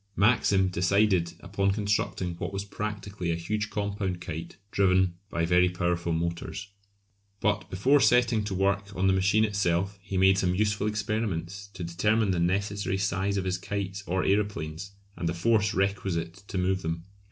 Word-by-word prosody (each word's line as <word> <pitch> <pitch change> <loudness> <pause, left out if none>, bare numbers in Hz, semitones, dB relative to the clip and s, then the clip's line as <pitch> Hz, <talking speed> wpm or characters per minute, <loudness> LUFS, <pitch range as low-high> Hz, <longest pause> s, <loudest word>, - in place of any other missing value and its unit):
Maxim 100 -3 +3
decided 90 0 +2
upon 100 0 0
constructing 100 -3 -1
what - - -3
was 100 0 -4
practically 100 -3 -4
a - - 0
huge 105 +5 -2
compound 100 -3 -2
kite 80 -2 -7
driven 95 -2 +3 0.2
by 85 -3 0
very 90 +1 +4
powerful 85 -1 -1
motors. 85 +4 -3 0.7
But - - 0
before 130 +10 +3
setting 120 -4 +4
to 100 -2 -3
work 100 +1 0
on 95 - 0
the 95 - +4
machine 100 +3 +3
itself 95 -1 0
he 95 -1 -4
made 95 +1 +5
some 90 -1 +1
useful 105 +1 +1
experiments 100 -3 -2
to 90 - -5
determine 105 +5 +1
the 90 - 0
necessary 100 +2 0
size 100 +1 0
of 95 - -1
his 90 -1 -1
kites 100 0 -4
or 90 +1 0
aeroplanes, 100 -3 -1 0.2
and 85 -1 -2
the 85 - -2
force 105 +3 +2
requisite 95 -4 -1
to - - -4
move 95 +1 +1
them. 80 0 -3
95 Hz, 165 wpm, -28 LUFS, 90-100 Hz, 0.7 s, made